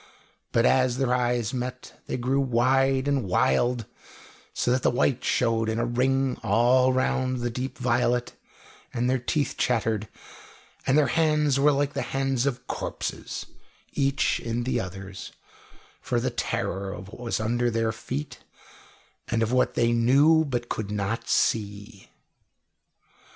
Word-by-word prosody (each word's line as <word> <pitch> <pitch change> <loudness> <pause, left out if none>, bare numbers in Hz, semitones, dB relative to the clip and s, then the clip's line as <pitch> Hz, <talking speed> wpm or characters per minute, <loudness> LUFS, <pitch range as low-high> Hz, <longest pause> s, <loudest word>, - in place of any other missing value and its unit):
But 115 0 +3
as 130 -1 +3
their 130 -2 +1
eyes 120 -2 0
met, 125 0 -6
they - - -2
grew 130 +3 0
wide 135 +2 +2
and 140 -3 +1
wild, 110 - +1 0.7
so 120 - 0
that 130 +1 +2
the - - +3
white 125 +1 +1
showed 115 -2 +1
in 110 - -1
a 120 - 0
ring 130 +2 +1
all 125 +5 +3
round 130 -1 0
the 120 0 -1
deep 130 +3 -5
violet, 120 -1 0 0.6
and 120 0 -1
their 130 0 +1
teeth 145 +4 -1
chattered, 110 -3 0 0.8
and 135 - +4
their 150 - +5
hands 150 -3 +2
were 150 +2 +5
like 145 +1 0
hands 135 -1 -1
of 125 -2 -3
corpses, - - -5 0.5
each 135 0 +1
in 115 +1 -3
the 130 - 0
other's, 95 0 -7 0.7
for - - -1
the - - -1
terror 95 +1 -2
of 95 -1 -8
what 110 - -12
was 120 -3 -2
under 120 +2 0
their 115 -1 0
feet, 135 +5 -6 0.9
and 115 -1 0
of 115 - -1
what 125 0 +2
they 120 0 +2
knew 140 +7 +4
but 120 -4 -3
could 110 -3 -4
not 105 +2 -3
see. 100 -1 -1
125 Hz, 145 wpm, -26 LUFS, 115-135 Hz, 0.9 s, their